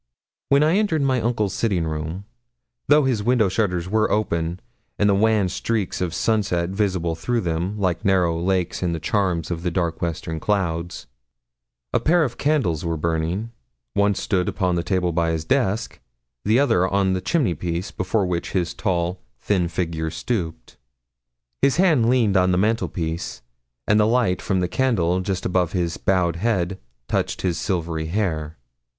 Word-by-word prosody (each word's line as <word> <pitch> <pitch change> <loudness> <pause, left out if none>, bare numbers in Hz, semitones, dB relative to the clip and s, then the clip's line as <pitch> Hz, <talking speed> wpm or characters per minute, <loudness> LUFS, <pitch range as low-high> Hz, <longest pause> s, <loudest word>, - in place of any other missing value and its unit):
When 140 +1 +5
I 160 +5 +3
entered 170 -9 +1
my 130 -3 +2
uncle's 110 -4 0
sitting 95 -5 0
room 80 +5 -4 0.6
though 150 +1 +5
his 125 -5 +1
window 115 -2 +3
shutters 90 -3 0
were 110 +2 +2
open 85 -5 -1 0.4
and 105 - +3
the 100 - +4
wan 105 -1 +3
streaks 100 +1 -2
of 90 -2 -1
sunset 100 -6 +1
visible 95 -4 0
through 115 +9 -1
them, 85 +4 -2
like 90 -4 -1
narrow 90 -4 +2
lakes 90 -1 0
in 90 -2 0
the 80 - -3
chasms 90 -3 0
of 85 -1 -3
the 90 - -1
dark 85 -2 -2
western 80 -1 -3
clouds 85 -3 -2 0.9
a - - +3
pair 170 +1 +3
of 125 -5 -4
candles 135 - +1
were 85 -1 -1
burning; 85 +7 -1 0.4
one 100 0 +2
stood 90 -2 0
upon 90 -3 0
the 85 - +1
table 90 -1 0
by 85 0 +1
his 80 -1 -2
desk, 115 -4 0 0.4
the 110 +3 +3
other 95 -10 +3
on 95 0 +1
the 95 - -1
chimneypiece, 90 - -1
before 95 +2 0
which 90 -1 -3
his 90 -3 0
tall, 90 -2 -1 0.2
thin 95 -4 +1
figure 80 -2 -2
stooped. 80 - -4 0.8
His 140 - +3
hand 155 -11 +4
leaned 115 -6 +3
on 90 -1 +4
the 90 - +2
mantelpiece, 90 - -1 0.4
and 105 +1 +4
the 105 - +4
light 115 -6 +2
from 95 -2 0
the 90 - +1
candle 90 -5 +1
just 95 0 -3
above 90 -2 +1
his 85 -3 -1
bowed 90 -3 +1
head 95 -3 0 0.3
touched - - -1
his 85 -3 0
silvery 80 -4 -2
hair. 80 -5 -2
95 Hz, 165 wpm, -22 LUFS, 85-110 Hz, 0.9 s, When